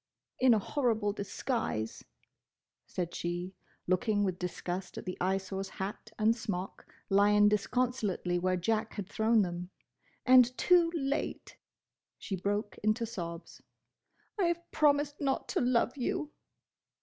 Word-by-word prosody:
"In 255 -3 +6
a - - +3
horrible 220 -3 0
disguise!" 200 - -3 0.8
said 175 -2 -3
she, 175 +2 -3 0.3
looking 205 +3 +1
with 185 -2 -1
disgust 180 +1 -4
at - - -6
the 185 - -3
Eyesore's 190 +1 -1
hat 200 +3 -6
and 220 +1 +3
smock 195 -5 -5 0.2
lying 205 +1 +5
disconsolately 210 -5 0
where 185 +1 +1
Jack 215 +5 -1
had 205 -3 -5
thrown 220 +1 +3
them, 175 0 -4 0.6
"and 255 -1 +6
too 350 -2 +5
late!" 280 -1 -2 0.6
She 195 - -4
broke 205 +2 -2
into 215 +3 +1
sobs. 175 -7 -7 0.8
"I 380 - +3
have 340 0 -2
promised 290 -1 +2
not 275 -2 0
to - - 0
love 245 -1 +2
you!" 300 +3 -2
210 Hz, 125 wpm, -31 LUFS, 185-250 Hz, 0.8 s, In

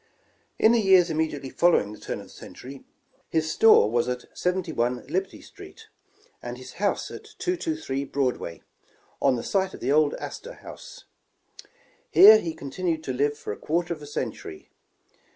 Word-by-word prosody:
In 220 - +5
the 235 -1 +3
years 185 -4 +5
immediately 155 -4 -2
following 165 -12 +2
the - - -12
turn - - -5
of - - -12
the - - -17
century, 135 +1 -11 0.5
his 160 -1 0
store 225 - +6
was 120 +1 +1
at 125 0 -6
71 160 -10 -1
Liberty 185 +7 -3
street, - - -14 0.5
and 120 0 -6
his 130 0 -11
house 205 - 0
at - - -9
223 320 - -2
Broadway, 130 -12 -3 0.6
on 135 -2 +3
the 115 - -4
site 190 -1 -1
of - - -12
the 130 - -1
old 150 0 +3
Astor - - -8
House. - - -12 1.0
Here 215 +2 +9
he 165 -4 -5
continued 160 +3 -3
to 130 - -3
live 145 +3 0
for 105 - -5
a - - -10
quarter 170 +2 -1
of 155 - -11
a 145 - -9
century. 80 - -6
155 Hz, 165 wpm, -25 LUFS, 130-185 Hz, 1.0 s, Here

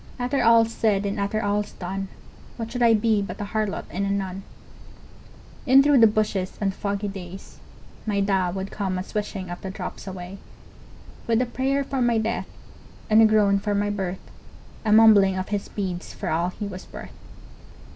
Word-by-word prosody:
After 250 +2 0
all's 230 -1 +5
said 205 -3 +1
and 200 +1 -2
after 200 +2 -1
all's 205 0 -1
done, 195 +2 -5 0.5
What 230 -1 -5
should 245 - -4
I 230 -1 +6
be 215 -1 +2
but 200 - -6
a - - -2
harlot 215 -1 -2
and 185 +5 -2
a 200 - -1
nun? 195 -1 -2 1.3
In 265 +2 +7
through 285 -2 +5
the 225 - +8
bushes, 210 -3 -1
on 195 -2 0
foggy 200 +1 -3
days, 190 -1 -9 0.5
My 205 -2 0
Da 195 -2 +1
would 190 +2 -5
come 190 -3 -2
a 185 - -3
swishing 200 -3 -4
of 175 - -7
the 190 - -5
drops 195 - -7
away, 185 +1 -7 0.9
With 230 -1 +2
a 250 - +2
prayer 265 +3 -1
for 270 -1 -3
my 240 -1 +3
death 220 +1 -2 0.6
and 215 +1 +7
a 220 - +7
groan 205 -2 +3
for 205 +1 -1
my 205 0 0
birth, 190 -2 -5 0.5
A 215 - 0
mumbling 210 -3 +6
of 185 - -4
his 205 -1 -3
beads 185 -3 -5
for - - -4
all 170 +3 0
he 205 +3 -6
was 185 -2 -8
worth. - - -9
205 Hz, 185 wpm, -24 LUFS, 195-225 Hz, 1.3 s, the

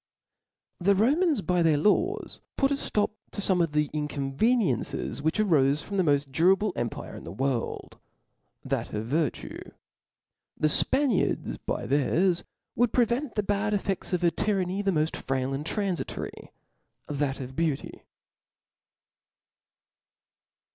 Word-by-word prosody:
The 195 +2 +3
Romans 285 - +2
by 180 -1 +1
their 160 -3 +4
laws, 350 - +1 0.2
put 275 0 +2
a - - +4
ftop 210 -7 0 0.2
to - - -5
fome 185 -3 +3
of 160 -3 -2
the 150 0 +2
inconveniencie^ 150 - 0
which 160 +2 0
aroie 150 -9 +3
from 200 +6 -5
the 190 - +3
mod 145 -3 +2
durable 190 +7 +3
empire 120 -1 -4
in - - -9
the - - -7
world, 130 -3 -3 0.7
that - - -2
of 105 +1 -2
virtue; 150 +3 -2 1.0
the 155 - +2
Spaniards 265 - +2
by - - -4
theirs, 170 +6 +2 0.3
would 240 -1 +2
prevent 245 +2 +1
the 210 - +1
bad 205 +1 0
ef* 200 - -2
ft£t% 195 -1 -3
of 180 0 0
a 170 - +4
tyranny, 195 -1 0
the 200 -1 +1
mod 155 -2 0
frail 135 0 -2
and 140 +2 -3
tranficory, 195 -1 -3 0.6
that 140 -2 -2
of 130 0 -7
beauty. 155 -3 -2
175 Hz, 135 wpm, -27 LUFS, 145-210 Hz, 1.0 s, their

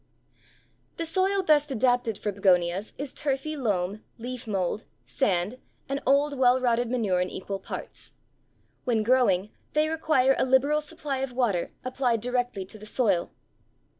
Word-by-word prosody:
_ - - -40
The 335 - -2
soil 380 +4 +1
best 300 -3 +4
adapted 245 -3 +1
for 210 0 -2
Begonias 185 0 +1
is 280 -1 -5
turfy 290 +2 -2
loam, 205 -6 -1
leaf 245 +1 -6
mold, 195 0 -1 0.2
sand, 205 -1 0 0.3
and 275 +1 -2
old 280 +2 +3
well 255 0 +5
rotted 240 -1 +1
manure 210 -8 +1
in 180 - -1
equal 195 +1 -5
parts. - - -7 0.7
When 230 -4 +1
growing, 215 -5 +3 0.2
they 305 +1 +2
require 310 -5 +3
a - - +4
liberal 270 +4 +3
supply 300 -3 -4
of 265 -1 -3
water, 230 -9 0
applied 255 -2 0
directly 245 -4 -1
to 215 +3 -13
the 215 - -11
soil. 205 -7 +1
245 Hz, 150 wpm, -27 LUFS, 205-275 Hz, 0.7 s, well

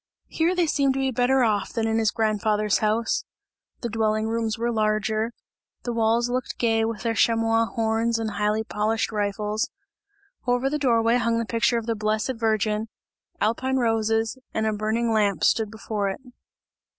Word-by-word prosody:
Here, 335 +3 +1
they 355 -1 +2
seemed 280 -3 +1
to - - -1
be 265 0 +1
better 255 +2 +2
off, 210 -3 0
than 225 -2 0
in 225 0 +1
his 220 -1 +3
grandfather's 215 -1 +1
house; 225 - 0 0.6
the 240 - -2
dwelling 215 0 0
rooms 225 -1 -1
were 235 +1 -1
larger, 215 0 0 0.5
the 240 - -3
walls 230 +1 +2
looked 250 +1 -3
gay 225 -2 +2
with 225 -1 -3
their 230 -1 0
chamois 225 0 +2
horns 225 +2 0
and 225 -1 -2
highly 210 +1 0
polished 220 +1 -1
rifles; 210 +1 -1 0.8
over 245 +2 +1
the 300 - -1
door 235 -5 +3
way 230 +2 +3
hung 230 -1 +1
the 230 - -1
picture 235 +1 +1
of 230 - -3
the 230 - 0
blessed 215 +3 -1
Virgin; 215 -1 0 0.5
alpine 260 +5 0
roses 225 0 +1 0.2
and 220 - 0
a 220 - +1
burning 220 +2 0
lamp 205 -3 +1
stood 220 -2 +3
before 215 -2 -3
it. 195 - -6
225 Hz, 175 wpm, -24 LUFS, 215-235 Hz, 0.8 s, his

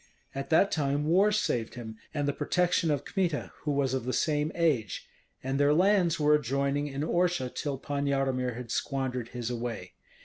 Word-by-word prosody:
At 135 0 -5
that 165 +5 +4
time 145 -1 0
war 190 +6 +4
saved 205 - -1
him, 110 -3 -7 0.2
and 145 -2 -1
the 145 - +1
protection 180 +1 +1
of 145 -2 0
Kmita, 175 -7 -1
who 150 - -2
was 140 -2 +1
of 130 -3 -2
the 130 - -1
same 150 0 +1
age; 145 - 0 0.4
and 135 +1 -1
their 145 +1 +4
lands 180 -2 +3
were 150 0 +4
adjoining 140 +1 +1
in 140 0 -4
Orsha 175 -5 0
till 145 -3 -3
Pan 140 +1 -3
Yaromir 130 -3 0
had 120 -1 -7
squandered 130 -3 -2
his 120 -1 -4
away. 115 -6 -5
140 Hz, 180 wpm, -29 LUFS, 130-160 Hz, 0.4 s, that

